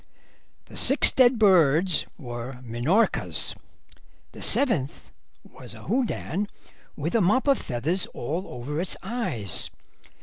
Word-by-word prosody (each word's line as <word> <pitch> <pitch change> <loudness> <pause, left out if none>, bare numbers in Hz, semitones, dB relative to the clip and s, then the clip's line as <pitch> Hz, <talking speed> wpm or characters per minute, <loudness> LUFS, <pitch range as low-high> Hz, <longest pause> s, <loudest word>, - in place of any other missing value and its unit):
"The - - -14
six - - +4
dead 250 -1 +4
birds 180 -4 +4
were 120 -1 -6
Minorcas; 125 - 0 0.8
the - - -12
seventh 175 - +1 0.3
was - - -12
a - - -12
Houdan 210 -3 -1 0.5
with 150 +4 -3
a 230 - +3
mop 215 +10 +2
of 275 - +4
feathers 155 +10 -2
all 165 +10 -4
over 140 +6 -4
its 185 - -3
eyes. 180 - -2
175 Hz, 115 wpm, -25 LUFS, 130-220 Hz, 0.8 s, six